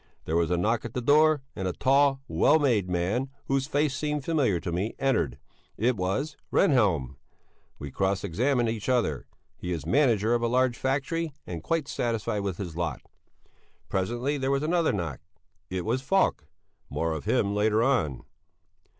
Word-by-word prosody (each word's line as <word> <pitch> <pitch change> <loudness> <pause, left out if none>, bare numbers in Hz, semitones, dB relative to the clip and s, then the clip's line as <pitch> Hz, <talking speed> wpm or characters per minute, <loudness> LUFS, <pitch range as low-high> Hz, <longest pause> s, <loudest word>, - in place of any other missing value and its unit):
There 80 - -1
was 85 -1 +2
a 90 - +1
knock 110 +6 +1
at 120 - -7
the - - 0
door, 150 +2 +4
and 95 - -3
a 90 - -1
tall, 135 +2 +3
well 155 - +4
made 120 - +1
man, 95 +10 -1 0.2
whose 135 -1 0
face 145 -1 +1
seemed 150 -1 -2
familiar 140 - +1
to 85 - -4
me, 95 +6 -2
entered 85 - 0 0.4
it 120 +3 +2
was 110 +11 -2 0.2
Rehnhjelm. 85 - +2 0.6
We 70 -1 -7
cross 95 +3 0
examined 120 +7 +1
each 110 +1 -3
other. 115 - 0 0.3
He 90 - -5
is 80 -4 -3
manager 115 - +3
of 120 - +1
a 120 - +1
large 125 0 +2
factory 145 +5 -1
and 85 -3 -6
quite 155 - -1
satisfied 115 -4 -1
with 100 -3 -3
his 90 -5 -6
lot. 85 -5 -3 0.9
Presently 120 +9 -1
there 135 0 -1
was 140 +1 +1
another 165 +1 +2
knock. 85 -9 -3 0.5
It 90 -1 -3
was 120 +4 0
Falk. 145 - +1 0.4
(More 80 0 -1
of 80 -3 -6
him 100 - +1
later 105 +2 +2
on.) 85 - +1
115 Hz, 170 wpm, -27 LUFS, 90-135 Hz, 0.9 s, door